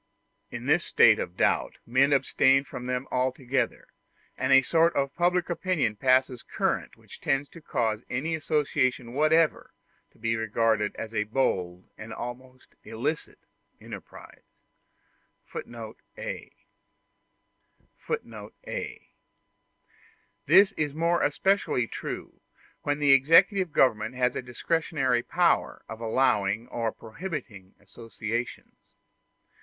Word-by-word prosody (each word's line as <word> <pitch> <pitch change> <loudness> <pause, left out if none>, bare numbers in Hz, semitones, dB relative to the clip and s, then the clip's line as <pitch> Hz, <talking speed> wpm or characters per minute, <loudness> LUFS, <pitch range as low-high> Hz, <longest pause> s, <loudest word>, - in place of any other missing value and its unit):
In - - -7
this - - +3
state - - +5
of 90 - -5
doubt - - +1
men 130 +4 +3
abstain 135 0 +3
from 125 -3 -8
them 125 +1 -2
altogether, 130 0 -1 0.5
and 130 +1 -1
a 135 0 +7
sort 165 +5 +3
of 140 0 0
public 175 0 +1
opinion 175 - -1
passes 130 +1 +2
current - - -2
which - - -15
tends 145 0 0
to 165 - -13
cause 110 -6 -1
any 145 +7 -2
association 135 -6 0
whatsoever 155 +3 +2 0.3
to - - -28
be 115 0 -1
regarded 110 -1 0
as 115 0 -7
a 105 -1 0
bold 90 -7 -1
and 110 +1 -8
almost 125 +2 -9
an 110 - -12
illicit 145 +8 -3 0.4
enterprise. - - -11 1.8
*a - - -6 1.5
[Footnote 465 0 -6
a: - - -6 1.4
This 200 +1 +7
is 150 -6 -3
more 170 +2 +1
especially 185 -4 +1
true - - -7 0.4
when 145 0 -1
the 145 -2 +3
executive 165 +7 +5
government 115 -4 +2
has 125 0 +1
a - - -2
discretionary 130 0 0
power 175 +6 +1
of 110 +1 -8
allowing 110 -2 +1
or 115 -2 -2
prohibiting 115 - -8
associations. 115 +2 -7
130 Hz, 115 wpm, -27 LUFS, 115-155 Hz, 1.8 s, a